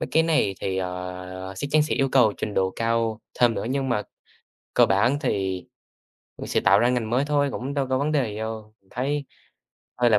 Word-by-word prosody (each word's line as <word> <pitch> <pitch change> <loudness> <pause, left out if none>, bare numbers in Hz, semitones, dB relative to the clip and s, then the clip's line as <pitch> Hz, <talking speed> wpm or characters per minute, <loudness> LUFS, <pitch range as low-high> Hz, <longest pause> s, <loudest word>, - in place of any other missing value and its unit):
mấy - - -2
cái 160 - +4
này 155 -12 +2
thì, 95 -1 -2
ờ, 90 0 -5
sắc 120 - -3
chắn 155 0 +5
sẽ 155 - -1
yêu 135 - +1
cầu 120 -6 +5
trình 105 - -4
độ 95 0 +1
cao 115 -1 0 0.2
thêm 120 -2 +5
nữa, - - -3
nhưng 135 -1 -1
mà 105 -4 +1 0.7
cơ - - +6
bản 115 +9 +2
thì 95 - -1 0.7
vẫn - - -6
sẽ - - +1
tạo 100 0 +5
ra 120 - +3
ngành 120 -3 0
mới 130 +3 +2
thôi, 145 -1 +1
cũng 135 +3 -4
đâu 140 -2 0
có 130 0 +1
vấn 150 +2 0
đề 135 -7 +1
gì - - -7
đâu, 110 -1 -6
mình 95 - -32
thấy 140 +3 -2 0.7
hơi 120 -1 +3
là 105 - +5
115 Hz, 225 wpm, -24 LUFS, 100-135 Hz, 0.7 s, cơ